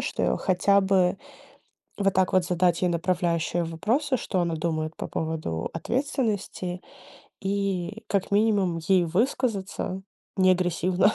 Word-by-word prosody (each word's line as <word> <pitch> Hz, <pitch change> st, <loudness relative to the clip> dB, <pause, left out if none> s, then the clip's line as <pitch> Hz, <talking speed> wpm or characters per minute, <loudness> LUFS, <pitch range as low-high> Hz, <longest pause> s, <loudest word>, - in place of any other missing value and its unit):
что -, -, -3 dB
я -, -, +2 dB
хотя 195 Hz, +2 st, +3 dB
бы 190 Hz, -1 st, +2 dB, 0.8 s
вот 195 Hz, -1 st, +2 dB
так 185 Hz, 0 st, +2 dB
вот 185 Hz, -1 st, +4 dB
задать 175 Hz, -1 st, +1 dB
ей 180 Hz, -, +2 dB
направляющие 175 Hz, -1 st, 0 dB
вопросы, 225 Hz, -, 0 dB
что 185 Hz, -5 st, -1 dB
она 170 Hz, -1 st, -1 dB
думает 155 Hz, -1 st, -2 dB
по -, -, -4 dB
поводу 155 Hz, -, -3 dB
ответственности, 220 Hz, -9 st, -2 dB, 0.6 s
и 200 Hz, +1 st, -2 dB
как 200 Hz, -2 st, -1 dB
минимум 200 Hz, -4 st, +2 dB
ей 185 Hz, -2 st, +4 dB
высказаться 195 Hz, -1 st, -1 dB, 0.3 s
не 185 Hz, -1 st, +5 dB
агрессивно. 185 Hz, +2 st, +2 dB
185 Hz, 130 wpm, -26 LUFS, 175-200 Hz, 0.8 s, не